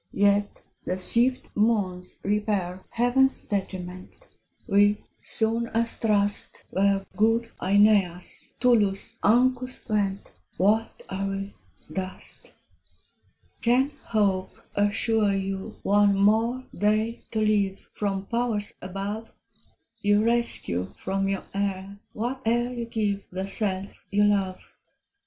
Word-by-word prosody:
Yet 205 0 +2 0.2
the 185 - -2
swift 240 +7 +1
moons 200 -5 0
repair 200 -3 -1
Heaven's 255 +3 +2
detriment: 185 - -5 0.4
We, 205 0 +3 0.2
soon 230 +1 -1
as 230 0 +1
thrust 205 -2 0
Where 195 0 +2
good 225 +2 +2
Aeneas, 195 -3 +2
Tullus, 215 -6 +2
Ancus 255 +3 +2
went, 200 -3 -1 0.3
What 215 +4 +1
are 195 +1 -3
we? 195 0 -4 0.4
dust. 185 -1 -6 1.1
Can 255 +4 +3
Hope 195 -4 0 0.2
assure 205 +1 +2
you 195 0 -3
one 205 0 +4
more 225 +5 +3
day 215 +2 +1
to 220 - -2
live 205 -3 +1
From 195 -2 -2
powers 230 -2 -1
above? 200 +4 -5 0.7
You 205 +1 +3
rescue 230 - +1
from 195 +1 -1
your 195 -1 -2
heir 195 0 -3 0.2
whate'er 240 +1 -1
you 240 -1 -4
give 210 -3 -1
The 190 +1 -4
self 195 -1 -1
you 205 0 +3
love. 195 -3 0
205 Hz, 105 wpm, -26 LUFS, 195-225 Hz, 1.1 s, one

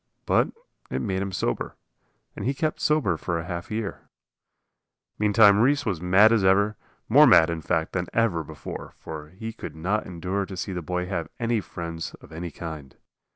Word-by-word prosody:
But - - +3 0.4
it - - -2
made 95 -4 -1
him 100 0 -3
sober, 90 -9 -2 0.6
and - - -6
he 135 +2 0
kept 155 +3 -1
sober 150 - +2
for 85 +1 -2
half 85 0 -5
a 105 - -3
year. 110 -3 -5 1.1
Meantime 105 -1 +6
Reese 140 +4 +3
was 95 -7 -1
mad 95 +5 +6
as 115 -4 +3
ever, 100 +3 +4 0.3
more - - +7
mad, 80 +1 +6
in 85 -1 -3
fact, 80 0 -1
than 90 -2 -1
ever 105 -8 +1
before. 75 -1 -8
For 75 -1 -8
he 110 +6 -7
could - - -8
not 95 +7 -1
endure 95 +3 -3
to 95 0 -7
see 95 - -3
the 90 - -3
boy 90 +2 -2
have 90 -3 -3
any 115 -2 +1
friends 85 -3 -6
of - - -17
any 85 +2 -5
kind. 75 -5 -8
95 Hz, 185 wpm, -25 LUFS, 85-105 Hz, 1.1 s, more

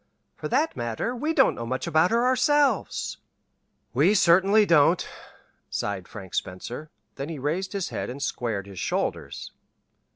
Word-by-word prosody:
For - - -5
that 295 +6 +1
matter, 120 - -3
we 300 +6 -1
don't - - +4
know 115 - -6
much 130 +2 -2
about 160 +3 +3
her 235 +2 +2
ourselves." 275 - +2 0.8
"We 165 - +4
certainly 195 +3 +5
don't," 165 0 +4 0.6
sighed 95 -3 -3
Frank 95 -4 -10
Spencer; 120 +11 -4 0.3
then 140 +3 -4
he 165 - -5
raised 165 +9 -2
his 195 -3 -2
head - - -4
and 130 +3 -6
squared 115 -7 -2
his 100 -3 -9
shoulders. - - -3
165 Hz, 150 wpm, -26 LUFS, -, 0.8 s, certainly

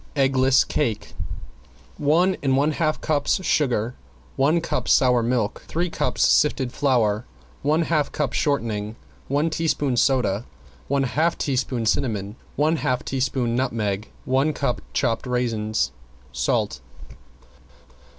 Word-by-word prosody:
~EGGLESS 135 -1 +4
CAKE~ 110 -3 -2 0.9
One 170 +6 +3
and 135 -2 +2
one 145 +3 +2
half 155 0 0
cups 155 +4 0
sugar, 125 -5 +1 0.4
one 150 +5 +3
cup 165 - -3
sour 125 -2 +4
milk, 115 -2 -1
three 170 +1 -1
cups - - +1
sifted 135 -4 +2
flour, 120 -6 +1 0.4
one 155 +4 +2
half 155 -3 0
cup 145 -4 -2
shortening, 110 -7 -1 0.3
one 145 +4 +1
teaspoon 150 -5 0
soda, 120 -4 +1 0.4
one 140 0 +1
half 155 +6 +1
teaspoon 130 -4 -1
cinnamon, 105 -3 -1 0.2
one 155 +3 +2
half 125 -4 -1
teaspoon 130 -2 -1
nutmeg, 110 -5 -1 0.2
one 135 +4 +2
cup 140 -4 -1
chopped 115 +2 0
raisins, 115 -3 0 0.4
salt. 65 0 -1
130 Hz, 120 wpm, -23 LUFS, 115-150 Hz, 0.9 s, ~EGGLESS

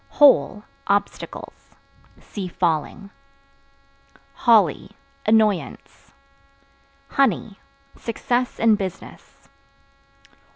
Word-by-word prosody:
Hole 210 - +4 0.2
Obstacles. 200 0 -4 0.4
See 195 -3 -7
Falling. 175 +3 -2 1.2
Holly 210 - +2 0.3
Annoyance. 215 -3 0 1.0
Honey 225 -6 0 0.4
Success 245 +2 -2
in 220 -2 +4
business. 190 -3 -9
210 Hz, 55 wpm, -22 LUFS, 190-230 Hz, 1.2 s, Hole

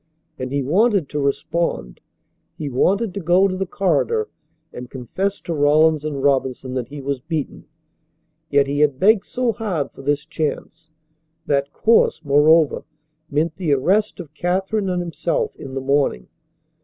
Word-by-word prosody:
And 130 0 -4
he 140 0 0
wanted 195 - +2
to 150 - -3
respond. 140 - -2 0.6
He 150 - -4
wanted 195 - +1
to 200 - -4
go 180 +2 +3
to 185 - -3
the 190 0 -3
corridor 200 - 0 0.4
and 125 0 -8
confess 185 - -3
to 170 - -4
Rawlins 155 +1 +3
and 145 -3 -4
Robinson 130 -2 0
that 125 -3 -3
he 145 +3 -9
was 140 0 -2
beaten. 155 +1 -5 0.8
Yet 140 -1 +3
he 140 +1 -2
had 145 -3 +2
begged 205 +1 +4
so 250 -2 0
hard 195 -10 -3
for - - -12
this 145 +1 -1
chance! 160 +1 -4 0.6
That 140 0 0
course, 225 -7 +3
moreover, 150 +2 +4 0.5
meant 155 +2 -1
the 170 -6 +1
arrest 195 +12 +1
of 155 -4 -9
Katherine 190 +5 -1
and 180 -1 -1
himself 440 - -2
in 135 -1 -9
the 135 - -2
morning. 135 - 0
155 Hz, 155 wpm, -21 LUFS, 140-190 Hz, 0.8 s, begged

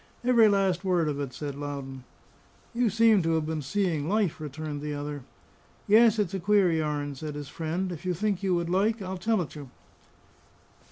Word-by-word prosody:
"Every 240 -3 +5
last 195 -3 +1
word 180 -4 +1
of 145 -1 -2
it," 140 -3 -3
said 145 +1 -5
Loudon. 140 -2 -6 0.7
"You 235 -1 +2
seem 225 -1 +4
to 165 -1 +1
have 160 -1 0
been 160 -1 -3
seeing 165 -1 -1
life," 195 -6 0
returned 150 0 -5
the 150 0 -4
other. 145 -2 -6 0.6
"Yes, 225 +1 +5
it's 205 -3 0
a 195 - -2
queer 195 -1 +3
yarn," 150 -3 -1
said 150 +2 -6
his 145 -1 -7
friend; 170 +3 -3
"if 170 0 -7
you 180 -1 -1
think 200 +1 -1
you 190 -2 +1
would 170 -1 -1
like, 205 +6 +1
I'll 185 0 -5
tell 215 -1 +1
it 155 - -11
you." 145 -4 -9
170 Hz, 190 wpm, -27 LUFS, 150-200 Hz, 0.7 s, Every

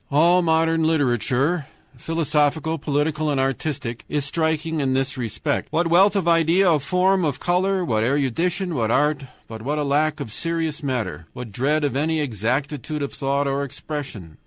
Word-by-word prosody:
All 170 +5 +4
modern 165 -1 +2
literature 145 +1 +1 0.3
philosophical, 160 0 0
political, 150 +2 0
and 140 -2 0
artistic 135 -2 -2
is 145 -2 -1
striking 160 +1 -1
in 130 -2 0
this 135 0 -1
respect. 120 +4 -2
What 170 +2 +1
wealth 190 +5 +5
of 190 -4 0
idea, 170 +3 +4
of 155 -4 +3
form, 185 +5 +2
of 145 -5 -1
color, 185 +1 +1
what 110 -5 +1
erudition, 165 +8 0
what 115 -6 0
art, 145 +2 +1 0.2
but 110 -1 -8
what 145 +6 -2
a 150 - 0
lack 150 +2 +1
of 135 -6 -6
serious 165 +3 -2
matter, 115 - -3
what 125 -3 -8
dread 145 +8 0
of 145 -2 0
any 160 +3 0
exactitude 140 - -2
of 140 - -4
thought 140 +1 0
or 140 +1 -1
expression! 135 - -7
150 Hz, 165 wpm, -22 LUFS, 135-165 Hz, 0.3 s, wealth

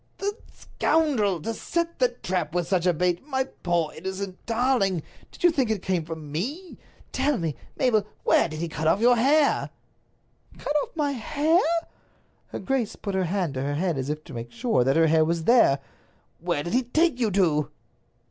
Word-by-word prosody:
"The 405 +1 -2 0.2
scoundrel! 240 - 0
To 225 - -2
set 335 +5 -3
a 250 - +6
trap 180 -9 -3
with 175 -2 0
such 185 -1 +1
a - - +5
bait! 175 +1 0
My 265 -2 0
poor 175 -10 -2
innocent 190 +2 -6
darling, 225 - +1 0.3
did - - -13
you 350 - +6
think 270 -7 0
it 215 -4 -1
came 180 -4 -1
from 160 -2 -7
me? 285 - -4 0.3
Tell 275 +1 +1
me, 165 -5 -2 0.2
Mabel, 220 -6 +2 0.2
where - - +3
did 155 0 -6
he 170 - -1
cut 155 0 -3
off 190 - +3
your 245 +2 +5
hair?" 285 +5 +3 0.9
"Cut 290 - -3
off - - -8
my 295 -3 0
hair?" 295 - +1 0.9
Her - - -6
grace 265 -5 -1
put 200 - -5
her 190 -1 +1
hand 180 -4 -1
to 130 - -3
her 145 +1 -2
head 175 +1 0
as 130 +2 -3
if 150 +1 -3
to 150 - -12
make 120 0 -6
sure 235 - +1
that 135 +4 +2
her 165 - +5
hair 160 0 +4
was 165 +1 -1
there. 230 - +5 0.6
"Where 170 -3 -1
did 170 - -4
he 250 - +4
take 280 +3 +1
you 230 -3 +2
to?" 160 -6 +2
195 Hz, 195 wpm, -25 LUFS, 165-260 Hz, 0.9 s, a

